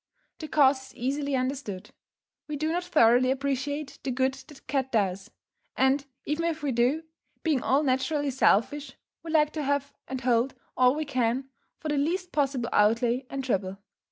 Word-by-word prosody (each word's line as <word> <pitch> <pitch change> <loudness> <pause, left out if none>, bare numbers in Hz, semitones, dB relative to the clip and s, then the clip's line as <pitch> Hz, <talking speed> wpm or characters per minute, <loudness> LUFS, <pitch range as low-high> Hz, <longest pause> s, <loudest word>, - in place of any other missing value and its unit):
The 310 - -6
cause 270 -3 +3
is - - -17
easily 275 +3 -1
understood: 255 -7 -3 0.6
we 300 - -4
do 310 +2 -1
not 350 +2 -1
thoroughly 255 -6 +4
appreciate 275 +2 -2
the 270 - -4
good 260 +1 +1
the 270 +2 -13
cat 265 -2 -2
does, 195 -4 0 0.5
and, 270 +1 +2 0.2
even 300 +3 -1
if 320 -2 -2
we 285 - 0
do, 250 +7 +1 0.4
being 305 -6 +1
all 275 +3 +2
naturally 275 +2 0
selfish, 265 +3 +2 0.3
we 330 - -9
like 305 -2 +3
to 310 - -3
have 285 0 -1
and 260 0 -4
hold 245 +1 +1 0.2
all 255 +1 +4
we 310 0 -2
can, 255 0 -1 0.3
for 310 - -5
the 295 - 0
least 355 +5 -1
possible 270 -5 0
outlay 235 +4 +2
and 275 -1 -4
trouble. 195 -6 -1
270 Hz, 170 wpm, -27 LUFS, 255-295 Hz, 0.6 s, thoroughly